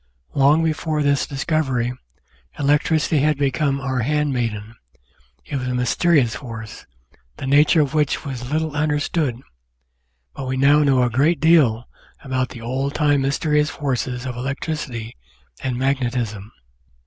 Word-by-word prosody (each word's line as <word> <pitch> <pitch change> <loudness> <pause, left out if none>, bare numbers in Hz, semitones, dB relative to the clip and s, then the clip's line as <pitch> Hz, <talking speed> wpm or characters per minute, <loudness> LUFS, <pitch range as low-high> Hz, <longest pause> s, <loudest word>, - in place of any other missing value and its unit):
Long 145 +4 +4
before 155 -1 -1
this 140 -1 +1
discovery 135 -4 -1 0.6
electricity 150 +2 +2
had 150 +1 +2
become 140 0 0
our 130 -1 -2
handmaiden; 120 -6 -1 0.7
it 140 - -4
was 130 -1 -3
a 125 - -1
mysterious 125 0 +2
force, 115 -4 -8 0.5
the - - -6
nature 145 +4 +4
of 140 -1 -1
which 150 0 0
was 125 -3 -5
little 155 -1 -1
understood, 150 -3 0 0.9
but 130 - -6
we 130 0 -2
now 140 +3 +5
know 135 -4 +3
a 125 - +2
great 145 +7 +2
deal 140 -8 +4 0.4
about 130 -2 -1
the 120 - -10
old 130 +4 -2
time 145 -2 +2
mysterious 150 +2 +1
forces 125 -3 -3
of 125 -2 -4
electricity 130 -3 -4 0.5
and 130 -2 -2
magnetism. 120 -6 -2
135 Hz, 135 wpm, -21 LUFS, 125-150 Hz, 0.9 s, now